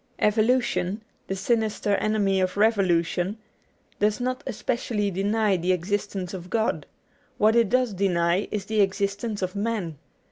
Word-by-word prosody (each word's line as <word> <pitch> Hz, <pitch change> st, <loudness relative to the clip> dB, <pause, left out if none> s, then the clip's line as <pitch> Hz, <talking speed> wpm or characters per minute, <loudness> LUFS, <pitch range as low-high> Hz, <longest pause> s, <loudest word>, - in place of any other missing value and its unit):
Evolution 215 Hz, -2 st, +1 dB, 0.2 s
(the 195 Hz, -, -2 dB
sinister 215 Hz, 0 st, 0 dB
enemy 200 Hz, -3 st, +1 dB
of 185 Hz, +1 st, -1 dB
revolution) 190 Hz, -2 st, +2 dB, 0.6 s
does 210 Hz, +2 st, +2 dB
not 255 Hz, +1 st, -2 dB
especially 230 Hz, -4 st, -1 dB
deny 205 Hz, +2 st, +1 dB
the 180 Hz, +2 st, +1 dB
existence 190 Hz, 0 st, -2 dB
of 180 Hz, -1 st, -7 dB
God: 225 Hz, +2 st, 0 dB, 0.5 s
what 215 Hz, +2 st, +4 dB
it 230 Hz, -3 st, +4 dB
does 250 Hz, -2 st, +2 dB
deny 180 Hz, -1 st, +1 dB
is 205 Hz, -2 st, -3 dB
the 215 Hz, 0 st, +1 dB
existence 200 Hz, +2 st, -1 dB
of 185 Hz, +2 st, -3 dB
man. 200 Hz, -7 st, -2 dB
205 Hz, 135 wpm, -25 LUFS, 190-220 Hz, 0.6 s, what